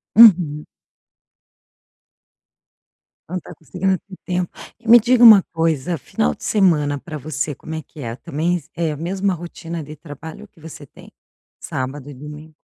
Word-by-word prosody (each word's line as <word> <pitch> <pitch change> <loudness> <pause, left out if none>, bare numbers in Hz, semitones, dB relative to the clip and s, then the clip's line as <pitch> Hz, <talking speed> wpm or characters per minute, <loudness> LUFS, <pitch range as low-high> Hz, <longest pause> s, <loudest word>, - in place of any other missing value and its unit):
Uhum. 175 -10 +6 2.6
Não 185 +1 -3
tá - - -12
conseguindo 185 +6 -2
ter 195 - -13
tempo. 180 -1 -1 0.3
E, 235 - -15
me 240 +1 +9
diga 240 +2 +3
uma 215 -5 +10
coisa, 165 0 0
final 75 - -1
de - - -16
semana 155 -8 +2
pra 155 +2 -8
você, 150 +1 -3
como 160 +4 -8
é 160 - -4
que 155 +1 -17
é? 115 -3 -5
Também 165 +4 -2
é 165 -2 -1
a - - -7
mesma 190 +5 -1
rotina 170 -1 -7
de 150 +1 -10
trabalho 160 +6 -10
que 165 - -24
você 155 -2 -10
tem? - - -17 0.5
Sábado 135 +2 -5
e - - -8
domingo. 150 +3 -11
160 Hz, 155 wpm, -20 LUFS, 145-180 Hz, 2.6 s, uma